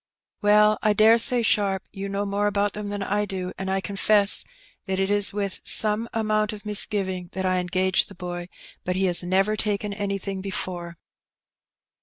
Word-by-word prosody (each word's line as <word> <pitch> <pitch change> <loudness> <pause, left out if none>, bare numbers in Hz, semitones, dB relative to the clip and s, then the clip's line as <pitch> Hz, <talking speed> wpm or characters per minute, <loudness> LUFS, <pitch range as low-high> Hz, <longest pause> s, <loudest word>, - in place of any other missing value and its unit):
'' - - -60
"Well, 210 +1 +4
I 215 - +2
dare 220 +2 +5
say. 245 0 +4
Sharp, 200 -3 0
you 195 0 -6
know 200 +1 -3
more 200 +1 -1
about 205 0 -1
them 210 -1 -6
than 205 -1 -4
I 205 +1 -1
do, 185 -2 -6
and 190 0 -4
I 190 0 0
confess 200 +1 +4 0.4
that 190 0 -2
it 195 +1 -1
was 205 -1 +5
with 200 -1 -4
some 220 +2 +3
amount 215 -1 -1
of 210 0 -11
misgiving 195 -4 -1
that 190 +1 -4
I 185 0 +1
engaged 185 +1 0
the 200 - -13
boy; 175 -1 -7 0.3
but 180 - -3
he 190 +1 0
has 175 -2 +3
never 190 +4 0
taken 210 -1 -2
anything 195 -1 -4
before." 175 -3 -6
200 Hz, 185 wpm, -23 LUFS, 190-210 Hz, 0.4 s, dare